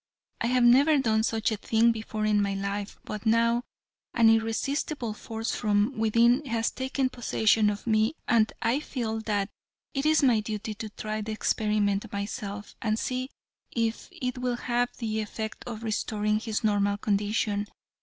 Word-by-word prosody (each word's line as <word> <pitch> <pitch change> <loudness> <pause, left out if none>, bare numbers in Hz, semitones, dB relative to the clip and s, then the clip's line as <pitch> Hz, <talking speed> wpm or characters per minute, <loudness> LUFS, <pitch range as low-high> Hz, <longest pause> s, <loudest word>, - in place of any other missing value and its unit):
I 230 - +1
have 250 0 +3
never 275 +6 +6
done 220 -5 +2
such 220 0 0
a 215 - -1
thing 225 +3 +3
before 220 -1 -3
in 210 -1 +3
my 200 -1 0
life, 200 +1 -4
but 210 -1 -6
now 230 +1 +3 0.5
an 225 -1 +6
irresistible 225 +2 0
force 225 +2 -4
from 210 +3 +1
within 235 +4 +3
has 230 -2 0
taken 260 0 -1
possession 220 -3 +2
of 205 -1 -4
me 220 +4 +2
and 225 -2 +3
I 240 +5 +2
feel 230 -7 -3
that 205 -2 -1 0.4
it 275 +2 0
is 310 -1 +4
my 245 -5 +5
duty 215 0 -4
to 215 +1 -6
try 215 +1 -4
the 215 +1 -4
experiment 210 -1 0
myself, 200 0 -5
and 215 -1 0
see 255 +2 -2 0.4
if 230 -1 -2
it 250 0 -4
will 250 -1 0
have 245 0 0
the 220 -2 -2
effect 220 +1 -5
of 230 -2 -6
restoring 215 -1 0
his 220 0 -3
normal 205 -1 +2
condition. 205 0 0
220 Hz, 165 wpm, -27 LUFS, 210-240 Hz, 0.5 s, never